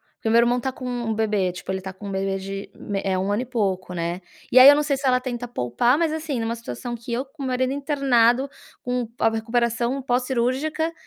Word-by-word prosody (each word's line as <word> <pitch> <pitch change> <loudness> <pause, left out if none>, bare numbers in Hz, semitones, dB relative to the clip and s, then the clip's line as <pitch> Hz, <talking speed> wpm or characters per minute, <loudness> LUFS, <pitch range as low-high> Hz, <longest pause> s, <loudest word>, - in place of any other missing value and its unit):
Porque 225 - -3
o - - +2
meu 230 - +6
irmão 240 +1 +3
tá 260 +2 -2
com 255 0 -9
um 245 -2 -3
um 220 - +1
bebê, 210 -4 0
tipo 175 - -10
ele 190 0 -3
tá 190 - -6
com 200 +2 -9
um - - -4
bebê 195 0 -1
de 195 +1 -6
me 200 -1 -4
eh, 190 -1 0
1 190 +2 -1
ano 210 - +1
e - - -9
pouco, 195 -7 -2
né. 170 +1 -3 0.3
E - - +3
aí 255 +2 +11
eu - - +9
não 295 - +2
sei 290 -1 +1
se 275 - -5
ela 250 -1 +4
tenta 245 -1 -4
poupar, 235 - +1
mas, 320 -1 +1
assim, 310 -5 -3
numa 230 +1 -2
situação 230 - -6
que 235 +1 -9
eu 245 +3 -1
com 280 +1 -10
o - - -2
meu 260 - -2
marido 255 +1 0
internado 275 -3 +2 0.3
com 245 -1 -2
a - - +3
a - - +5
recuperação 235 +3 0
pós-cirúrgica 260 +5 0
240 Hz, 260 wpm, -23 LUFS, 205-260 Hz, 0.3 s, aí